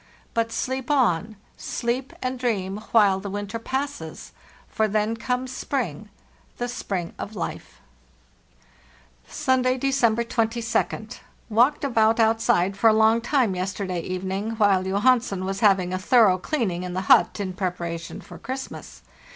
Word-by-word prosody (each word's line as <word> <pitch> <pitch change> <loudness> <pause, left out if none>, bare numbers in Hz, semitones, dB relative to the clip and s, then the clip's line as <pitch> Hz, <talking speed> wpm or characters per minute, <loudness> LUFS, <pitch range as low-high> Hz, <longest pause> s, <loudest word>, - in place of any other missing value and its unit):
But 230 0 0
sleep 260 +2 -3
on— 220 - +2 0.2
sleep 245 +3 -3
and 255 0 -2
dream, 200 -6 -1
while 200 -4 +5
the 200 +1 -6
winter 205 +2 -4
passes; 265 - -5 0.4
for 220 0 0
then 215 +2 0
comes 250 +2 -2
spring—the 215 - -5
spring 190 -7 -4
of 215 - -6
life! 180 - -6 1.5
"Sunday, 255 0 +1
December 245 -4 +2
22d. 230 -1 -1 0.3
Walked 245 +8 +3
about 225 -4 +3
outside 225 -4 +2
for 225 +3 +5
a - - +4
long 220 +1 +4
time 240 -4 +1
yesterday 185 0 -3
evening, 190 +5 -3
while 205 -4 +3
Johansen 200 0 +2
was 195 +1 -3
havy 195 -3 +5
ing 180 0 -4
a 185 - -1
thorough 200 -2 +4
clearing 195 - -1
in 180 -1 -5
the 185 - -1
hut 195 - +4
in 190 -2 -3
preparation 175 -1 -4
for - - -12
Christmas. 265 +1 -7
220 Hz, 135 wpm, -24 LUFS, 190-245 Hz, 1.5 s, while